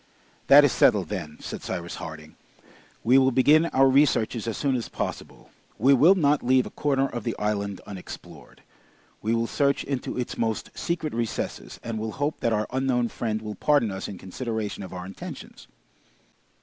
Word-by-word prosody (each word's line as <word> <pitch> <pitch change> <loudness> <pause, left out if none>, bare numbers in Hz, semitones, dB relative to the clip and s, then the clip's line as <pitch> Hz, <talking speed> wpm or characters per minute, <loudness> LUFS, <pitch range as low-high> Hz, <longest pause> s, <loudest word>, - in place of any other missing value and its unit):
"That 145 +1 +9
is 140 - +3
settled, 95 -6 +3
then," 80 -7 -5
said - - -6
Cyrus 85 -2 -5
Harding. 80 0 -9 0.7
"We 130 +3 +6
will 130 0 +4
begin 150 +6 +4
our 135 -3 +4
researches 130 -5 +2
as 115 - -2
soon 140 -2 +1
as 120 - -3
possible. - - -6 0.3
We 135 +6 +5
will 155 +9 +6
not 150 -5 +2
leave 130 0 +3
a - - -8
corner 135 -2 +1
of 120 -4 -6
the 115 - -2
island 100 -2 -2
unexplored. 95 -3 -11 0.6
We 110 +2 0
will 115 0 +1
search 140 +3 +1
into 135 -3 -4
its 125 - -4
most 110 -2 -2
secret 165 -3 -3
recesses, 115 -1 -4
and 115 -2 -4
will 110 0 -4
hope 145 +2 -2
that 115 - 0
our 105 -1 +1
unknown 130 -2 +1
friend 110 -2 -3
will 105 -1 -5
pardon 140 -4 +2
us 95 0 -5
in 100 - -7
consideration 110 +2 -4
of 95 - -8
our 90 -1 -6
intentions!" 95 0 -9
115 Hz, 175 wpm, -25 LUFS, 105-135 Hz, 0.7 s, That